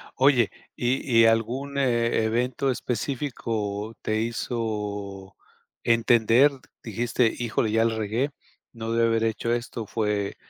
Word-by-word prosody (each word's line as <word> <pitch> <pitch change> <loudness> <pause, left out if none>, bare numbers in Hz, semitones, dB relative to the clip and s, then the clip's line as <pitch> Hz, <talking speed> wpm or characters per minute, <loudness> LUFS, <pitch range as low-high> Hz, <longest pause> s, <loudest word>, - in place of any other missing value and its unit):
Oye, 130 -4 +4 0.3
¿y 120 -1 +1
y - - +7
algún 125 +5 +1
evento 120 0 +1
e - - +4
específico 115 -5 -3
te 110 0 0
hizo 105 -4 -4 0.5
entender, 115 +3 +4 0.3
dijiste 115 +1 0
híjole, 115 -2 0
ya 115 +1 +3
la 115 -1 +1
regué? 115 +7 -1 0.4
No 115 0 -5
debí 115 0 +3
haber 115 0 +1
hecho 115 +1 0
esto. 120 -1 -4
Fue 105 -2 -1
115 Hz, 120 wpm, -25 LUFS, 110-120 Hz, 0.5 s, y